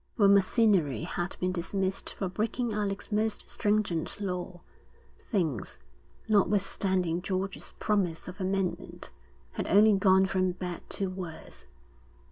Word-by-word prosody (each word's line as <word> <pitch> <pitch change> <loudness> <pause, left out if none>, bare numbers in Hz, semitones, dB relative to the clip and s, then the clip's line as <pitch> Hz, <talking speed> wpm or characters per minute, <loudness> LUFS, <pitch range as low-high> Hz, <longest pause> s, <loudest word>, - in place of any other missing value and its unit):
When 200 -3 +6
Macinnery 195 - +3
had 175 +2 -3
been 185 0 0
dismissed 190 +2 -2
for 195 - -2
breaking 220 +5 -1
Alec's 205 -1 -3
most 215 +1 -1
stringent 205 -7 0
law, 180 -3 -4 0.7
things, 160 - -1 0.5
notwithstanding 190 -4 +2
George's 190 +1 -3
promise 190 -6 0
of 185 +2 -8
amendment, 190 -1 -2 0.4
had - - -4
only 210 +2 +6
gone 190 -1 +5
from 185 -1 +1
bad 180 -1 -5
to 195 -2 -1
worse. 180 -4 -8
190 Hz, 115 wpm, -29 LUFS, 180-205 Hz, 0.7 s, When